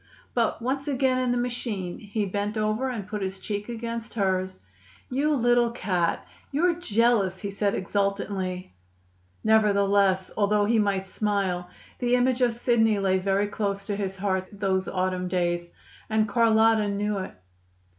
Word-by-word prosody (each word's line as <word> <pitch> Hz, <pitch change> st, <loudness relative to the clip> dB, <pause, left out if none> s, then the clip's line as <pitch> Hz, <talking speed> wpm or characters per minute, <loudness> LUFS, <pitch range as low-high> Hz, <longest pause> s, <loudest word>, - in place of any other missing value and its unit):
But, 230 Hz, -1 st, 0 dB
once 270 Hz, +3 st, -2 dB
again 260 Hz, -2 st, +1 dB
in 255 Hz, -1 st, 0 dB
the 245 Hz, -, +1 dB
machine, 235 Hz, -7 st, -3 dB
he 210 Hz, 0 st, -2 dB
bent 205 Hz, +2 st, -2 dB
over 215 Hz, +5 st, 0 dB
and 220 Hz, -6 st, -5 dB
put 210 Hz, 0 st, -4 dB
his 190 Hz, 0 st, -3 dB
cheek 205 Hz, +2 st, -4 dB
against 230 Hz, 0 st, -5 dB
hers. 190 Hz, -3 st, 0 dB, 0.5 s
"You 290 Hz, +4 st, +2 dB
little 240 Hz, -1 st, +3 dB
cat! 185 Hz, -7 st, -1 dB, 0.3 s
You're 340 Hz, +5 st, +2 dB
jealous," 230 Hz, -, +1 dB
he 200 Hz, -, -4 dB
said 200 Hz, 0 st, 0 dB
exultantly. 190 Hz, -, -2 dB, 0.7 s
Nevertheless, 200 Hz, -3 st, +3 dB
although 205 Hz, 0 st, +2 dB
he 225 Hz, +1 st, +3 dB
might 195 Hz, -2 st, 0 dB
smile, 190 Hz, -4 st, -1 dB, 0.3 s
the 245 Hz, -1 st, +2 dB
image 250 Hz, 0 st, +2 dB
of 240 Hz, -2 st, +3 dB
Sidney 225 Hz, -3 st, +2 dB
lay 190 Hz, -1 st, +2 dB
very 195 Hz, +2 st, +1 dB
close 200 Hz, -1 st, -3 dB
to 205 Hz, -, -2 dB
his 195 Hz, -1 st, -3 dB
heart 190 Hz, -1 st, -1 dB
those 195 Hz, -2 st, -1 dB
autumn 185 Hz, -1 st, -1 dB
days. 175 Hz, -1 st, -1 dB, 0.4 s
And 215 Hz, 0 st, +2 dB
Carlotta 220 Hz, 0 st, +4 dB
knew 205 Hz, 0 st, -1 dB
it. 185 Hz, -, -6 dB
205 Hz, 150 wpm, -26 LUFS, 190-235 Hz, 0.7 s, Carlotta